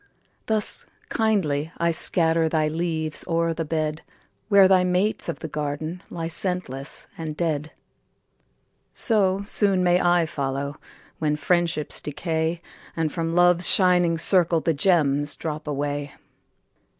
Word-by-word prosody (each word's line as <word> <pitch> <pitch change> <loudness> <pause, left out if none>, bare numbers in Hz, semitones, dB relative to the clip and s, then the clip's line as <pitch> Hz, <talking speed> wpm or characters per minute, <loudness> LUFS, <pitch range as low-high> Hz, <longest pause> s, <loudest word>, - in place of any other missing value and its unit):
Thus 220 -1 +1 0.2
kindly 165 -9 0
I 170 0 +1
scatter 165 0 +2
Thy 155 -1 +1
leaves 160 -1 -2
o'er 165 0 0
the 165 0 -3
bed, 155 0 -2 0.5
Where 200 -2 +7
thy 185 -1 +4
mates 180 +4 0
of - - -5
the 160 - -4
garden 155 +3 -4
Lie 165 -1 -4
scentless 165 -6 -3
and 155 -2 -5
dead. 155 -3 -2 1.2
So 200 -4 +2
soon 200 -2 +2
may 180 0 +3
I 175 -1 +3
follow, 140 -1 -4 0.4
When 150 -1 0
friendships 165 0 -1
decay, 160 +2 -3 0.3
And 160 -2 0
from 165 0 -3
Love's 175 0 +5
shining 180 -3 +4
circle 170 -1 +3
The 165 +1 0
gems 145 -3 +2
drop 155 -1 -6
away. 145 0 -3
165 Hz, 125 wpm, -24 LUFS, 150-180 Hz, 1.2 s, Where